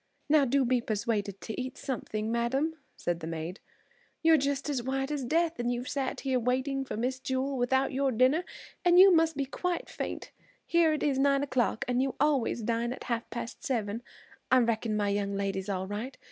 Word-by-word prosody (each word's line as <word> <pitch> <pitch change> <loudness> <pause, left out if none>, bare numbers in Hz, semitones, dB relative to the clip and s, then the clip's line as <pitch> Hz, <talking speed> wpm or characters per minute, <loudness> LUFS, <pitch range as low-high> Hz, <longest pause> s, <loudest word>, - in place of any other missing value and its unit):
"Now 300 -2 +5
do 270 +1 +2
be 245 0 +2
persuaded 205 -3 -2
to 225 +3 -4
eat 255 0 -6
something, 220 -4 -3
madam," 265 +7 0 0.2
said 175 -1 -2
the 160 - -6
maid. 165 +3 -5 0.6
"You're 325 0 +7
just 280 -1 0
as 280 -4 -1
white 270 +3 -2
as 290 -3 -2
death, 330 +4 +1
and 240 0 0
you've 245 +1 -3
sat 275 -2 -2
here 260 -2 +1
waiting 260 +3 0
for 260 - -5
Miss 255 +3 -1
Jewel, 265 +1 -1
without 265 +2 +1
your 270 0 +1
dinner 255 +8 +3 0.4
and 350 0 +5
you 385 0 +9
must 325 -2 +3
be 280 - 0
quite 350 +6 -3
faint. - - -5 0.3
Here 335 -2 +3
it's 290 -3 0
nine 275 0 +3
o'clock, 250 -5 0
and 250 0 +1
you 270 0 -1
always 275 -5 +1
dine 235 +2 0
at - - -9
half 235 -1 -3
past 235 +3 -6
seven. 230 -6 -1 0.5
I 255 - +6
reckon 230 -2 +1
my 205 -1 +1
young 200 0 -1
lady's 195 0 -2
all 190 -1 -1
right. 215 +7 -5
255 Hz, 195 wpm, -29 LUFS, 225-280 Hz, 0.6 s, you